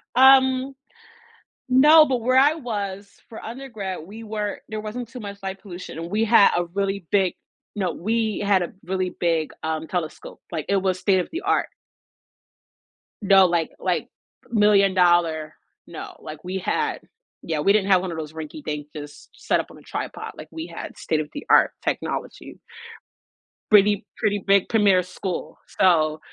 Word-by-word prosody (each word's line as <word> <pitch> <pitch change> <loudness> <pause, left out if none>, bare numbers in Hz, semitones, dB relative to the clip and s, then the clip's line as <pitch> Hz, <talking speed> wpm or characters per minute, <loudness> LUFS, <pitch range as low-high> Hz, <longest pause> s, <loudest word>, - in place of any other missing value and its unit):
Um, 265 +1 +5 0.9
no, 300 +5 +7
but 255 -4 -1
where 255 +2 +2
I 285 +3 +6
was, 200 -7 -5 0.2
for 225 - -9
undergrad, 225 -7 -6
we 220 +4 -10
were 210 -1 -4
there 215 -1 -4
wasn't 230 +3 -6
too 250 - -9
much 200 -2 -7
light 195 0 -5
pollution 180 -5 -9
and 165 +1 -6
we 215 +2 +1
had 220 -2 +6
a 175 - 0
really 195 +1 -3
big 190 -3 +2 0.4
no, 185 -4 -1
we 220 +2 -1
had 200 -2 +2
a 175 - -3
really 185 0 -2
big, 165 -3 -1
um, 160 0 -3
telescope. 170 -4 -5
Like 155 - -3
it 200 - +3
was 185 -1 0
state-of-the-art. 265 - 0 1.5
No, 195 -2 +6
like 170 -2 0
like, - - -1 0.4
million-dollar. 180 -7 +3 0.3
No, - - -9
like 155 0 -10
we 185 +1 -4
had 185 - -1 0.4
Yeah, 160 -2 -2
we 195 +7 +3
didn't 200 -2 +2
have 185 - +5
one 185 -1 -4
of 165 - -6
those 155 -1 -6
rinky 155 -1 -8
dink, 150 -1 -4
just 145 -1 -10
set - - 0
up - - -5
on - - -14
a - - -15
tripod. - - -6
Like - - -9
we 325 +1 -6
had - - -8
state-of-the-art 155 - +1
technology. - - -4 1.1
Pretty 205 -1 +5
pretty 205 -1 0
big 195 -1 +4
premier 205 -5 +4
school, 180 0 -6 0.2
so 155 -4 +3
195 Hz, 155 wpm, -23 LUFS, 175-220 Hz, 1.5 s, no